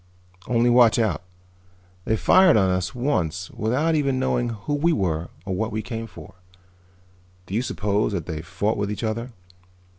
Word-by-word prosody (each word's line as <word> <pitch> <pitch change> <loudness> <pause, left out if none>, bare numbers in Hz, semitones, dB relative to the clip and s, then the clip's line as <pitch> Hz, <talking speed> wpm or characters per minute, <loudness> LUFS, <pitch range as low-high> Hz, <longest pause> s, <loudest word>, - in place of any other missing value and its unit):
"Only 120 0 +3
watch 120 -2 +6
out. 105 -9 0 0.8
They 110 - +1
fired 185 - +5
on 95 -3 +3
us 90 +3 -2
once 90 - -1
without 130 +10 0
even 140 -4 +1
knowing 125 -2 0
who 115 +6 -4
we 155 +4 +2
were 85 - -1 0.2
or 95 - -3
what 110 +4 -2
we 110 0 -3
came 115 -2 -5
for. - - -12 1.1
Do 95 - -9
you 110 - +1
suppose 105 -4 -1
that 85 -6 -3
they 80 -2 -5
fought 95 +6 -2
with 100 0 -1
each 105 - -5
other? 115 +3 -3
110 Hz, 170 wpm, -23 LUFS, 95-125 Hz, 1.1 s, watch